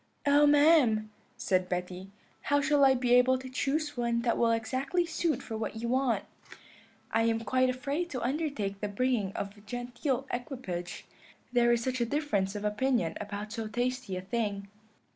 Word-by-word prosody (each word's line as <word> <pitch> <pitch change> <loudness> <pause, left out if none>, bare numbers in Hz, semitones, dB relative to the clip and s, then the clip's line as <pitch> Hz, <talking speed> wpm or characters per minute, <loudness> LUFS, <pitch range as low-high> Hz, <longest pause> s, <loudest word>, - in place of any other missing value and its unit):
"'Oh, 290 +1 +5
ma'am,' 290 -8 +4 0.3
said 185 -6 0
Betty, 180 +1 -4 0.4
'how 285 0 +3
shall 290 0 +3
I 265 -1 +6
be 245 -1 +1
able 250 +1 +5
to 260 0 -8
choose 295 +4 -1
one 235 -1 0
that 235 - +2
will 235 - +2
exactly 260 +9 0
suit 330 -1 -1
for 225 - -6
what 220 0 -4
you 230 +1 -3
want? 250 -5 +1 0.9
I 225 - +2
am 225 0 +1
quite 255 +2 +2
afraid 285 +7 -2
to 255 -6 -4
undertake 260 -8 -2
the 210 - -2
bringing 210 -1 0
of 200 +1 -5
a 205 - -17
genteel 245 +4 -3
equipage, 240 -9 -5 0.5
there 240 -1 +4
is 235 -1 +2
such 255 0 -1
a - - +3
difference 215 -9 -1
of 205 0 -4
opinion 210 -5 +1
about 210 +1 -6
so 225 -2 -4
tasty 245 -4 -2
a - - -4
thing.' 200 0 -3
240 Hz, 175 wpm, -30 LUFS, 210-270 Hz, 0.9 s, I